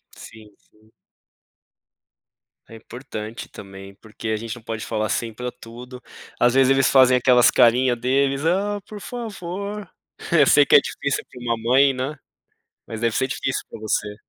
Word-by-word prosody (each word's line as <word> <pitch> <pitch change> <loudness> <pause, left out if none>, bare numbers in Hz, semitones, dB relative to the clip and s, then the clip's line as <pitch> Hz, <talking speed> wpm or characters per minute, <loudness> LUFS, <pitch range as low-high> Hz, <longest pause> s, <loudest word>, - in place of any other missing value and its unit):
Sim, 110 -2 -14
sim. 110 +1 -29 1.8
É 115 - -11
importante 115 -1 -8
também, 95 0 -12
porque 110 +1 -10
a 110 - 0
gente 110 +1 -6
não - - -13
pode 110 -1 -6
falar 110 -1 -2
sim 115 +3 -2
para 125 +2 -5
tudo, 125 +1 -12 0.4
às 120 0 +3
vezes 135 0 +4
eles 135 -1 +3
fazem 130 -1 +5
aquelas 125 -1 +5
carinha 125 +1 +3
deles: 135 +4 0
"Ah 200 +4 0
por 215 -2 -10
favor". 205 -3 -6 0.4
Eu 150 -4 +6
sei 145 +1 +5
que - - +4
é - - +10
difícil 140 -1 -3
para 125 - -12
uma 120 -1 -1
mãe, 130 +4 +3
né, 135 +4 -4 0.7
mas 110 - -6
deve 115 -2 0
ser 130 - +1
difícil 135 -1 -3
para - - -10
você. 105 -1 -2
125 Hz, 165 wpm, -22 LUFS, 115-140 Hz, 1.8 s, é